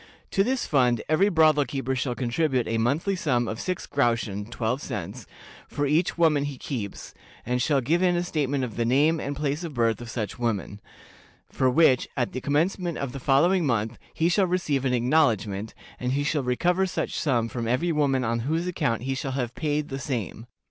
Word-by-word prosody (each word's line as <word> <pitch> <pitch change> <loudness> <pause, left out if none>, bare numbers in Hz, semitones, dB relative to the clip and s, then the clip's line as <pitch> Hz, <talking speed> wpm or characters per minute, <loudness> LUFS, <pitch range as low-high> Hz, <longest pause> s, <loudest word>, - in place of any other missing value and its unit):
To 195 - +3
this 260 +3 -1
fund 125 -5 +2
every 180 +6 +3
brothel 155 -4 +4
keeper 135 0 -3
shall 125 -1 -2
contribute 130 +1 0
a 115 0 0
monthly 145 - +1
sum 125 -9 0
of 110 +1 -4
six 185 -1 -3
groschen 115 -6 0
(twelve 120 +3 -2
cents) - - -6 0.4
for 145 - -2
each 155 +6 +1
woman 160 -4 +3
that 145 - -2
he 140 - -8
keeps, 110 -9 -6 0.3
and 125 +1 0
shall 140 0 +2
give 165 +8 +1
in 180 -1 +3
a 175 - 0
statement 145 -5 -1
of 115 -4 -5
the 120 - +1
name 145 +7 +3
and 140 -1 -3
place 150 +3 -2
of 160 -5 -6
birth 115 -1 +1
of 120 - -8
such 115 -2 -4
woman; 105 -3 -2 0.7
for 130 - +2
which, 130 -2 +4
at 120 -2 0
the 130 - -5
commencement 170 +5 0
of 140 -3 -3
the 135 - -6
following 165 +8 +3
month, 115 -5 -1
he 165 - +1
shall 185 +2 +3
receive 150 -7 0
an 130 - +1
acknowledgment, 115 -6 +1 0.2
and 125 +1 -1
he 145 +1 0
shall 145 0 0
recover 175 +9 +1
such 185 - -3
sum 120 -6 +1
from 115 0 -4
every 130 +9 +1
woman 140 -4 +1
on 115 0 0
whose 160 +8 -1
account 120 -10 -1
he 135 +1 -1
shall 135 0 -3
have 125 -3 -2
paid 150 0 -2
the 135 -1 -4
same. 120 -4 -4
135 Hz, 205 wpm, -26 LUFS, 120-160 Hz, 0.7 s, brothel